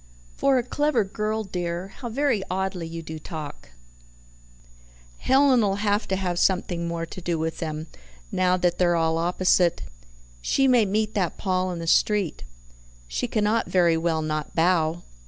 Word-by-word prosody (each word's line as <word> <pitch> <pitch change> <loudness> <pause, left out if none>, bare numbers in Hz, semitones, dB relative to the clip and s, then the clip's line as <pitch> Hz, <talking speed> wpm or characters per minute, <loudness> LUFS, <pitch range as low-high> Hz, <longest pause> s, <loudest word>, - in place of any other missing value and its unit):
"For 275 -1 +3
a 245 - +1
clever 290 -2 +1
girl, 215 +2 -2
dear, 180 -1 -4
how 240 +5 -8
very 260 -3 +1
oddly 190 -2 -2
you 165 0 -7
do 160 0 -7
talk. 155 -3 -8 1.5
Helen'll 255 -7 +4
HAVE 205 +1 0
to 190 - 0
have 180 -2 -1
something 180 -3 +1
more 170 0 -3
to 185 - -9
do 170 -1 -1
with 160 +1 -3
them, 155 -1 -4 0.5
now 185 0 +2
that 175 -1 0
they're 175 -1 +3
all 165 0 +1
opposite. 175 - +2 0.6
She 270 - +2
may 245 -4 +5
meet 215 +2 0
that 185 -5 -1
Paul 185 -1 0
in 175 - -4
the 165 - -5
street. 195 - +2 0.6
She - - -2
cannot 215 +1 +1
very 175 -3 +3
well 160 -1 0
not 155 -1 -3
bow." 165 -1 +2
180 Hz, 155 wpm, -25 LUFS, 165-210 Hz, 1.5 s, may